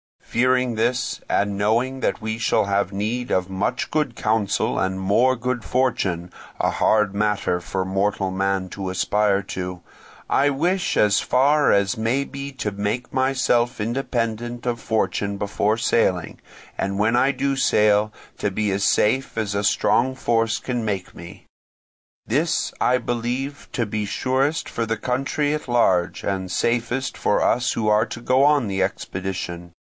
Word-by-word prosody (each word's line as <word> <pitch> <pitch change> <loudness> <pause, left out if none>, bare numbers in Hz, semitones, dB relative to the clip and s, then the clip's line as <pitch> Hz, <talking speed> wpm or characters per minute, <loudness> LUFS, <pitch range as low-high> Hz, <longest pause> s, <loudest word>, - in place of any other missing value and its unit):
Fearing 125 0 +1
this, 120 +3 0
and 100 0 +1
knowing 115 +6 +1
that - - -1
we 110 0 -3
shall 110 -1 +2
have 100 -1 0
need 115 +5 -2
of 95 0 +1
much 100 +6 -2
good 150 -6 0
counsel 110 -3 0
and 95 +1 -1
more 115 +7 +3
good 125 0 -3
fortune—a 100 -9 -1
hard 105 -2 +2
matter 105 -3 0
for 95 +2 -3
mortal 95 0 0
man 95 0 -1
to 95 -1 -5
aspire 100 +2 +1
to—I 90 +9 -3
wish 175 +7 0
as 105 -1 +4
far 145 +3 +3
as 100 0 +1
may 115 +5 +1
be 140 0 -7
to 110 -5 -3
make 105 +5 -3
myself 130 -3 +1
independent 120 0 -2
of 120 -1 -1
fortune 100 -3 -1
before 105 +1 0
sailing, 95 -6 0 0.4
and 100 0 -2
when 115 +4 +2
I 135 +3 +4
do 140 0 -1
sail, 105 -3 +3 0.2
to 105 - -1
be 105 +1 -1
as 100 +1 0
safe 130 +3 +1
as 105 -3 -1
a 100 0 -1
strong 130 +4 +2
force 115 -2 +1
can 120 -3 -3
make 100 -4 -3
me. 85 0 -12 0.8
This 155 +8 0
I 125 0 +3
believe 125 +4 -3
to 120 - 0
be 105 0 -3
surest 135 +8 0
for 115 - -2
the 115 0 -2
country 135 +5 -1
at 150 - -4
large, 95 -8 +2
and 95 -1 -2
safest 120 +6 -1
for - - +1
us 125 +1 +2
who 110 -2 0
are 105 +1 +4
to 115 0 -8
go 130 +3 +3
on 145 -5 +3
the 95 -1 -1
expedition. 90 -2 -4
110 Hz, 155 wpm, -22 LUFS, 100-125 Hz, 0.8 s, as